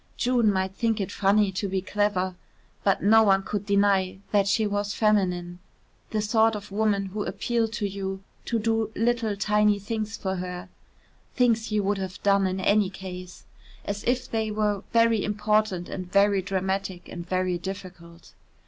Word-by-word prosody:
June 240 -3 +3
might 190 -1 -1
think 225 +1 0
it 195 - -3
funny 200 0 +2
to 200 +2 -2
be 190 0 0
clever, 190 -1 0 0.5
but 195 - +2
no 220 +2 +6
one 195 -2 +4
could 205 0 -4
deny 200 -2 +2
that 200 -2 +3
she 215 +2 +2
was 205 0 -2
feminine 180 -5 +1 0.5
the 215 -1 -1
sort 220 +1 +3
of 205 -1 -8
woman 205 -1 +1
who 205 +2 -4
appealed 230 0 -1
to 215 -2 -2
you 195 0 -5 0.2
to 235 - 0
do 225 0 0
little 230 -2 +1
tiny 210 0 +3
things 215 +2 -4
for 190 -1 -3
her 180 +1 -6 0.7
(things 230 -3 +2
you 210 -1 +1
would 200 0 0
have 190 -1 -6
done 200 -1 +3
in 185 +1 -2
any 200 +1 +3
case), 185 -1 -9 0.4
as 205 0 -4
if 250 +1 0
they 220 -1 -1
were 210 -2 0
very 230 -2 +3
important 210 -3 0
and 185 -1 -6
very 200 0 +4
dramatic 190 -1 -3
and 175 0 -8
very 185 -1 0
difficult. 180 -3 -9
200 Hz, 165 wpm, -26 LUFS, 190-215 Hz, 0.7 s, no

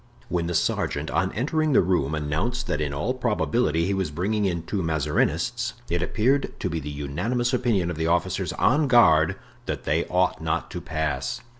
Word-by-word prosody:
When 85 -2 -1
the 85 - -2
sergeant 75 -1 0
on 95 +2 +1
entering 155 +5 0
the - - +6
room 80 -5 +1
announced 95 +13 -2
that 75 - -1
in 75 -2 -1
all 75 - -1
probability 115 - +1
he 100 - 0
was 95 -4 -1
bringing 100 +7 -1
in 85 -3 -1
two 95 +4 -2
Mazarinists, 80 - 0 0.2
it 85 0 +1
appeared 130 +10 0
to - - -1
be 80 - -2
the 75 -1 -6
unanimous 90 - -2
opinion 115 -8 +1
of 85 - -6
the 80 0 0
officers 85 0 0
on 145 +2 +2
guard 80 -11 +5 0.3
that - - -3
they 80 +4 +1
ought 90 -1 +1
not 80 0 -2
to 90 - -5
pass. 80 -6 -2
90 Hz, 185 wpm, -25 LUFS, 80-120 Hz, 0.3 s, the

